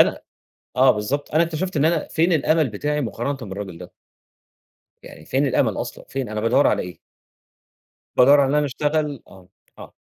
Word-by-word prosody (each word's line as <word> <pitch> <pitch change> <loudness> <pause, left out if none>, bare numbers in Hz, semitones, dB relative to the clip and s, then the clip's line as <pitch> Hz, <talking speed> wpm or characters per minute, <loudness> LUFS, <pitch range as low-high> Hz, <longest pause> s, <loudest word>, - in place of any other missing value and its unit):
أنا - - +3 0.6
آه 130 0 +6
بالضبط 130 +9 -2
أنا 165 - +5
اكتشفت 170 +2 -3
إن 145 - +2
أنا 165 -1 +1
فين 170 +3 +1
الأمل 155 -1 +2
بتاعي 145 +8 -2
مقارنةً 130 +2 -3
بالراجل 95 -3 -7
ده؟ 90 - -11 1.1
يعني - - -13
فين 140 +2 +1
الأمل 130 - +1
أصلًا! - - -7
فين 135 -3 -4
أنا 110 0 -3
بادوّر 115 - +3
على - - +1
إيه؟ 90 -1 -9 1.2
بادوّر 140 +3 +6
على 135 - +2
إن 145 - 0
أنا 150 0 +2
اشتغل 145 0 -2
آه، 90 -1 -17 0.3
آه، - - -11
140 Hz, 175 wpm, -22 LUFS, 115-150 Hz, 1.2 s, آه